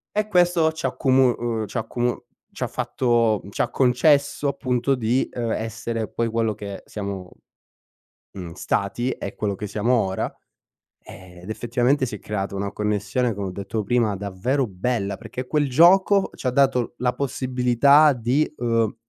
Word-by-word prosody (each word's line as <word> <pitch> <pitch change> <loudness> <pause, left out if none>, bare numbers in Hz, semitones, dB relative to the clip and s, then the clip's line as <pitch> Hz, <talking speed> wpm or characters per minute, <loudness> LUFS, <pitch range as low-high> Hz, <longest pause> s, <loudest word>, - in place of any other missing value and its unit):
E 210 0 +1
questo 175 -4 +3
ci 160 -3 -6
ha - - +3
accomu 130 0 +3
uhm, 115 -2 -2
ci - - -6
ha - - +1
accomu 120 +2 -2 0.3
c'ha - - -3
fatto 115 -4 +1
mhmm, 100 - -10
c'ha - - -1
concesso 140 +3 +2
appunto, 130 -1 0
di, 125 +2 0
uhm, 115 -2 -3
essere 115 0 -3
poi 115 - -1
quello 115 -1 0
che 100 -1 -7
siamo, 100 -3 -6 1.0
mhmm, 90 -3 -8
stati 100 +8 -1
e - - -5
quello 105 -2 -2
che 105 - -5
siamo 105 +4 0
ora. 95 -5 -1 0.7
Ehm, 90 -1 -13
ed 95 - -9
effettivamente 120 +5 +1
si 110 - -5
è - - -12
creata 100 -2 -4
una 100 0 -3
connessione, 105 +3 -1
come 100 -1 -4
ho - - -5
detto 100 +3 -4
prima, 115 0 +1
davvero 100 +8 -1
bella 100 0 -2
perché 125 +5 -7
quel 150 0 +1
gioco, 190 +7 +5
c'ha 130 - -2
dato 135 0 +3
l - - -8
la 125 0 +1
possibilità 130 +2 +3
di, 125 +5 0
uhm, 115 -2 +1
120 Hz, 165 wpm, -23 LUFS, 105-130 Hz, 1.0 s, gioco